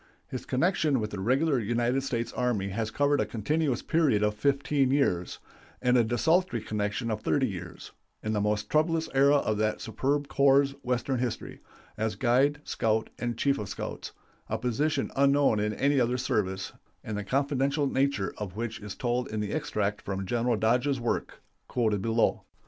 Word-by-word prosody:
His 130 - -6
connection 150 -1 +2
with 105 -1 -3
the 100 - -5
Regular 135 +7 +2
United 120 +4 0
States 120 -3 -3
Army 120 -6 0
has 110 +3 -2
covered 145 +4 +2
a - - +1
continuous 135 +4 -1
period 145 -11 +2
of 105 0 +2
fifteen 140 +3 +1
years, 130 -11 +1 0.4
and 125 -3 +3
desultory 125 - +2
connection 105 +2 -2
of 110 -1 -3
thirty 135 +2 +1
years 90 -5 -8 0.3
in 110 - -1
the 105 - +1
most 105 0 0
troublous 160 +3 +1
era 140 +2 +5
of 110 -7 +1
that 110 0 0
superb 140 +5 -1
corps' 140 0 +4
Western 125 +1 -1
history 125 -2 -4 0.4
as 110 0 -1
guide, 135 +6 +2
scout, 110 -1 0
and 120 -1 -2
chief 140 +2 +1
of 105 -3 -5
scouts - - -6 0.4
a - - -1
position 135 +5 -1
unknown 140 -4 +3
in 105 +1 0
any 140 +5 +2
other 125 0 +1
service, 100 -6 -1 0.3
and 110 - -4
the 105 - -3
confidential 140 +4 0
nature 135 -6 0
of 100 -3 -5
which 115 0 -4
is 105 -2 -7
told 125 0 -1
in 110 - -3
the 105 -1 -2
extract 105 -10 -1
from 95 -1 -4
General 120 +3 0
Dodge's 125 +5 +1
work, 120 -1 -3 0.2
quoted 110 -5 0
below. 115 +2 +1
120 Hz, 170 wpm, -28 LUFS, 105-140 Hz, 0.4 s, era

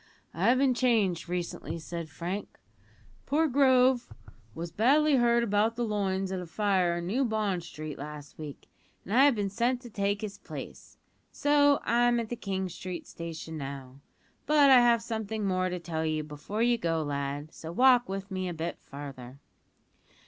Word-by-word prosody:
"I've 215 +10 +3
been 265 -1 +3
changed 215 -9 +1
recently," 175 -1 -4
said 165 0 -6
Frank; 175 +7 -5 0.7
"poor 315 +3 +2
Grove 260 -2 +3 0.4
was 165 0 -5
badly 285 - +4
hurt 235 -1 +3
about 215 +1 +1
the 240 0 -1
loins 195 -3 -1
at 190 - -2
a 180 - -7
fire 185 -2 +1
in 170 - -4
New 235 +10 0
Bond 215 -6 0
Street 155 -3 -8
last 150 0 -9
week, 150 -3 -8 0.4
and 200 - -5
I 265 +4 +7
have 285 -4 +4
been 200 -2 -2
sent 240 +4 +1
to 240 -3 -11
take 200 0 -1
his 205 -2 -6
place, - - -9 0.3
so 290 -1 +3
I'm 240 0 +3
at 230 -2 -4
the 240 - -3
King 190 -4 -3
Street 180 0 -7
station 160 -1 -7
now. 135 -1 -7 0.5
But 290 -2 +6
I 260 - +9
have 235 -1 +4
something 220 -2 -3
more 185 -1 +1
to 180 - -3
tell 160 -2 -3
you 155 -1 -1
before 155 +9 -4
you 240 -1 +3
go, 165 -3 0
lad, 145 +1 -4
so 160 - -8
walk 245 +4 +5
with 195 +1 -5
me 185 -1 -2
a 175 - -5
bit 165 +2 -4
farther." 135 -3 -9
195 Hz, 175 wpm, -29 LUFS, 165-240 Hz, 0.7 s, I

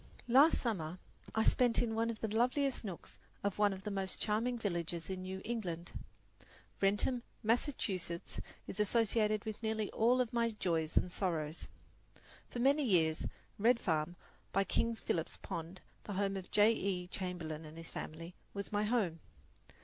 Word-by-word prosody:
Last 275 +7 +7
summer 180 -8 -2 0.4
I 220 - +4
spent 245 0 +4
in 230 -2 +1
one 225 +1 +1
of 225 -2 -4
the 220 - 0
loveliest 255 +3 +2
nooks 190 -6 -7 0.2
of 200 0 -1
one 205 -1 +5
of 190 0 -6
the 210 - -3
most 195 -1 -2
charming 230 +3 +1
villages 170 -4 -2
in 185 -1 -3
New 190 +1 -5
England. 180 -7 -3 0.9
Wrentham, 205 +5 +2 0.2
Massachusetts, 210 - -1 0.3
is 195 - -7
associated 215 0 +2
with 215 0 -5
nearly 220 -2 -1
all 240 +3 +4
of 245 -2 0
my 235 -1 +3
joys 165 -7 -1
and 180 - +3
sorrows. 165 -5 -2 0.8
For - - -6
many 275 +5 +4
years 165 - +3 0.3
Red 230 +3 +5
Farm, 160 -3 0 0.4
by 195 - +3
King 230 +3 +1
Philip's 165 -6 -2
Pond, 170 +3 -6 0.2
the 205 - -4
home 195 0 0
of 190 -2 -4
Mr. - - -33
J. 210 +2 +7
E. 190 -4 -1
Chamberlin 175 -4 -4
and 155 +1 -10
his 165 0 -8
family, 165 +3 -6 0.2
was 200 +2 -4
my 205 0 +1
home. 210 -8 +1
200 Hz, 165 wpm, -35 LUFS, 175-230 Hz, 0.9 s, Last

